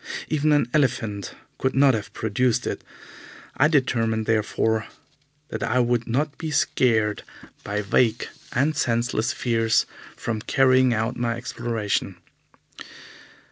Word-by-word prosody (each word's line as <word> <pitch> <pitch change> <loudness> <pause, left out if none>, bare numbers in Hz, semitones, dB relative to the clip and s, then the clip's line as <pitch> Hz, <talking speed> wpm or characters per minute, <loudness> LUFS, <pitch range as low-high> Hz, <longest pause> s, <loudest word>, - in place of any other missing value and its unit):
Even 155 0 +1
an 145 -5 +3
elephant 110 -8 0 0.2
could 130 - 0
not 135 0 +5
have 105 -3 -4
produced 115 +2 0
it. - - -4 0.7
I 145 - +5
determined, 115 -7 +1
therefore, 110 0 0 0.6
that - - -5
I 125 - 0
would 120 -1 +1
not 140 +5 -1
be 160 - -3
scared 110 -7 +1 0.4
by 105 +1 -2
vague 115 +3 +1 0.2
and 145 +5 +1
senseless 120 -3 0
fears 115 -4 +1 0.3
from 110 -2 -3
carrying 130 +1 +3
out 115 +2 -1
my 120 -1 -1
exploration. 115 -5 -2
120 Hz, 120 wpm, -24 LUFS, 110-130 Hz, 0.7 s, not